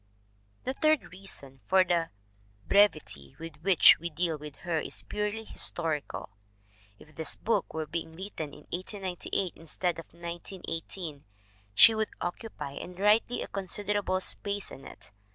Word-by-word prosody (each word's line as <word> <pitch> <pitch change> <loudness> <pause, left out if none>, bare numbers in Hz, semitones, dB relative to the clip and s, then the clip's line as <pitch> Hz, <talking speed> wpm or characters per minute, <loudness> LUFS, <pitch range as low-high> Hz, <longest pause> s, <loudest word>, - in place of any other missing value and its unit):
The 260 - -1
third 310 +1 +2
reason 160 -8 -6
for 190 0 +6
the 170 -2 +1 0.6
brevity 155 - +3
with 165 -2 -8
which 180 +2 +7
we 170 +2 -3
deal 165 +1 0
with 150 -1 -8
her 170 -2 +1
is - - -2
purely 210 +1 -2
historical. 160 - -1 0.7
If 155 - -17
this 160 +2 0
book 220 -4 0
were 160 0 -1
being 160 +1 -4
written 170 -5 -5
in - - -12
1898 185 0 -2
instead 165 +2 -2
of 165 - -7
1918, 170 -2 -6 0.5
she 225 - +10
would 220 -1 0
oc 175 - -2
cupy, 140 -11 -6
and 180 0 -9
rightly, 215 +4 +4
a - - -6
considerable 200 0 0
space 200 +1 -1
in 135 - -10
it. 100 - -12
175 Hz, 145 wpm, -30 LUFS, 160-200 Hz, 0.7 s, she